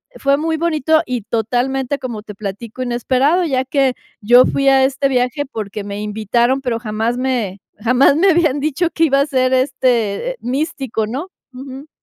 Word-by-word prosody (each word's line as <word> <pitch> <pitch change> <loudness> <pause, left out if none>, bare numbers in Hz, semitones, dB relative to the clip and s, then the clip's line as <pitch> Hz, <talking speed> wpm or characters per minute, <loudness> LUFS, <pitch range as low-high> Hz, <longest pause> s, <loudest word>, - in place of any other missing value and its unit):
Fue 275 0 +1
muy 320 +2 -1
bonito 315 -1 +1
y, 250 -2 -3
totalmente, 245 +5 -1
como 230 -5 -6
te 210 - -9
platico, 210 +4 -7
inesperado, 255 +7 +1
ya 265 -5 0
que 265 -1 +1 0.3
yo 245 +4 +6
fui 275 - 0
a 270 -1 +5
este 270 +1 +1
viaje 255 +2 0
porque 215 -5 -6
me 200 0 -6
invitaron, 220 +5 0
pero 245 -4 -2
jamás 225 +1 -2
me 240 -7 -2 0.2
jamás 250 +5 +3
me 370 +6 +4
habían 315 -4 +2
dicho 310 +4 0
que 330 - -1
iba 275 -3 +2
a 280 - 0
ser 255 -2 +1
este, 255 - +1
eh, - - -8
místico, 265 -4 -2
¿no? 265 - -5 0.3
Ujú. 270 +3 -9
255 Hz, 175 wpm, -18 LUFS, 230-280 Hz, 0.3 s, yo